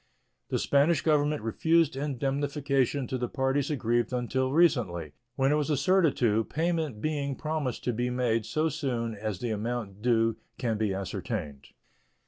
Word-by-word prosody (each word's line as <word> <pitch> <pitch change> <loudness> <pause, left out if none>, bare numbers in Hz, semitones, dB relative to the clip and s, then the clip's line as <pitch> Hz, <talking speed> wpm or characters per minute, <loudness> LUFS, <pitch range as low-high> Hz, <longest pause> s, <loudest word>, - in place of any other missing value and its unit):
The - - 0
Spanish 145 +1 +3
Government 150 -4 +2
refused 160 +7 +2
indemnification 140 0 0
to 130 +1 -3
the 125 - -1
parties 135 0 0
aggrieved 120 -4 0
until 130 +1 -1
recently, 115 - +2 0.2
when 135 +1 +2
it 150 - +3
was 150 0 -1
assented 155 +3 +3
to, 115 -2 +2
payment 160 -8 -1
being 145 -3 -1
promised 155 -4 -3
to 125 - 0
be 120 +2 -1
made 120 -3 0
so 155 +1 +1
soon 125 -7 -2
as 105 -1 -4
the 120 - -1
amount 110 -2 -3
due 115 -1 +2 0.2
can 115 -3 -1
be 110 -2 +1
ascertained. 90 - -4
130 Hz, 150 wpm, -28 LUFS, 115-145 Hz, 0.2 s, Spanish